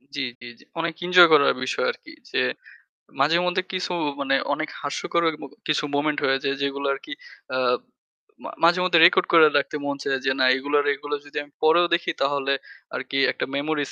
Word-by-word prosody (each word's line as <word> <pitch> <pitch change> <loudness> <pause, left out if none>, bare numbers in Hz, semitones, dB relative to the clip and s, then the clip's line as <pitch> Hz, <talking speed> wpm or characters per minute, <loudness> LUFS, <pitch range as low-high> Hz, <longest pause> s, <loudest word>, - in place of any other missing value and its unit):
জি, 140 - -2 0.2
জি, - - -10
জি। - - -19 0.2
অনেক 165 0 -2
এনজয় 180 -1 +7
করার 140 -2 +5
বিষয় 130 - -1
আরকি। - - -15 0.2
যে - - -2 0.8
মাঝে 150 +5 +3
মধ্যে 180 +1 0
কিছু 185 0 -3 0.3
মানে 135 0 +1 0.2
অনেক 155 - -3
হাস্যকর 160 +3 -1 0.3
কিছু 155 - +1
মোমেন্ট 150 +1 0
হয়েছে 135 +1 0
যেগুলো 140 0 -2
আরকি 140 - -10 0.4
আ - - 0 0.9
মা - - -7
মাঝেমধ্যে 175 0 +4
রেকর্ড 175 - +4
করে 165 -2 +8
রাখতে 145 +1 -2
মন 140 0 -2
চাই 135 - -2
যে 135 - +2
না 130 - +4
এগুলো 145 +2 -3
আর 145 - -4
এগুলো 145 +1 -5
যদি 145 - -10
আমি 145 - -20
পরেও 165 +3 +5
দেখি 170 0 +1
তাহলে 140 0 0 0.4
আরকি 135 - -4
একটা - - -4
মেমোরিস 145 0 -2
145 Hz, 175 wpm, -23 LUFS, 140-170 Hz, 0.9 s, করে